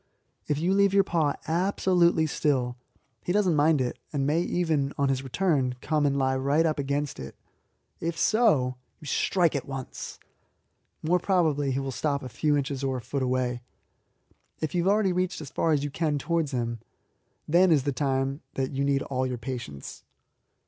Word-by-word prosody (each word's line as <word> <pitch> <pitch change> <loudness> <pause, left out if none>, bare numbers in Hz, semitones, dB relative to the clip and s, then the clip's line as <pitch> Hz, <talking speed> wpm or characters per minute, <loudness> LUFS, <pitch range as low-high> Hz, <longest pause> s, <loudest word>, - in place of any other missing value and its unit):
If 145 - 0
you 175 +5 +1
leave 200 0 +3
your 200 - +6
paw 160 -6 0
absolutely 175 -1 +2
still, 130 -5 0 0.5
he - - -2
does 205 +2 +3
not 180 - +3
mind 150 0 +3
it, 125 - -2
and 140 -2 -1
may 155 +4 +2
even, 160 -6 0
on 140 -1 +2
his 135 -1 0
return, 135 -3 0
come 150 +1 +1
and 140 0 0
lie 130 -1 +1
right 140 +5 +2
up 155 -2 0
against 140 0 -2
it. 65 - -8 0.6
If 165 0 -3
so, 150 - +3 0.2
you 155 - -13
strike 170 +3 +1
at 140 - -3
once. 135 -2 -7 0.8
More 175 +3 +2
probably 160 -7 +1
he 135 - 0
will 135 0 -3
stop 140 +1 -1
a 130 - -6
few 145 +5 +1
inches 140 -1 -3
or 135 -1 0
a - - -3
foot 140 +4 -3
away. 125 -1 0 1.0
If 155 -2 -3
you 175 - +1
have 190 - +3
already 205 -3 +2
reached 180 0 -1
as 150 -4 -8
far 165 - +1
as 145 -2 +2
you 145 - -3
can 150 -1 0
towards 160 +1 0
him, 120 -2 -2 0.7
then 175 +3 +5
is 145 -5 +4
the 140 - 0
time 135 +1 -1
that 135 -1 -1
you 140 0 -1
need 140 -1 +1
all 130 -1 -1
your 125 -1 -3
patience. 115 - -7
145 Hz, 190 wpm, -27 LUFS, 135-170 Hz, 1.0 s, your